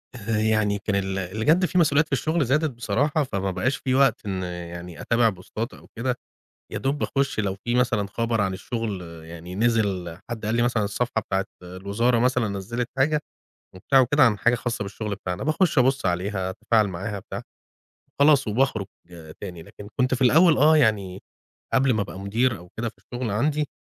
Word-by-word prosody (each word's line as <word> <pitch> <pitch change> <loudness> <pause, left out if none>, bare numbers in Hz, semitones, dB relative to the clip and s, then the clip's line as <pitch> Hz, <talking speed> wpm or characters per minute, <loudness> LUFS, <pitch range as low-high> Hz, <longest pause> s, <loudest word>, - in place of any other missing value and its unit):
آآ 110 -1 -2
يعني 110 -1 +2
كان 100 0 -1
ال 95 -1 -1
اللي 95 +4 -3
جَد 170 +5 +5
في 180 - -1
مسؤوليات 150 -3 +4
في - - -28
الشُغل 155 +4 +1
زادت 150 +5 +2
بصراحة، 130 +6 0
فما 100 -7 -2
بقاش 110 +9 0
في 130 -1 -1
وقت 135 -4 +3
إن 95 -2 -2
يعني 85 -1 -7
أتابع 115 -1 +3
بوستات 110 +5 -5
أو - - -15
كده، 125 +2 -1 0.6
يا - - -3
دوب 135 +2 -1
باخُش 140 -4 -1
لو 100 -2 0
فيه 120 0 0
مثلًا 120 -5 +1
خبر 115 +2 -1
عن 95 -2 0
الشُغل 105 0 -4 0.2
يعني 85 +2 -9
نزل، 100 -6 0
حد 115 -2 -5
قال 110 +2 0
لي 120 - +2
مثلًا 120 -2 +1
الصفحة 110 +3 -1
بتاعة 95 -1 -1 0.2
الوزارة 100 +7 0
مثلًا 125 -1 +2
نزِّلت 105 +5 -3
حاجة 150 +3 +3 0.6
وبتاع 135 +8 +3
وكده 130 +3 +4
عن 115 -5 +4
حاجة 115 +4 +3
خاصة 120 -2 -3
بالشُغل 105 +1 -4
بتاعنا، 95 0 -4
باخش 155 +3 +1
أبُص 130 +2 +2
عليها، 95 +2 -1
أتفاعل 110 +2 +2
معاها 100 +3 -4
بتاع، - - -7 0.8
خلاص 145 -2 +5
وباخرُج 110 -2 +1 0.5
تاني. 90 -4 -7
لكن 100 +5 -12
كنت 130 +1 +2
في 130 - -1
الأول 160 +6 +6
آه، 155 +3 +6
يعني 100 -9 +1 0.5
قبل 135 0 +4
ما 110 - +1
أبقى 95 - -8
مدير 115 +4 +1
أو 90 - -14
كده 115 +1 -1
في 110 - -11
الشُغل 125 -2 -5
عندي، 145 +8 +1
110 Hz, 185 wpm, -24 LUFS, 100-130 Hz, 0.8 s, الأول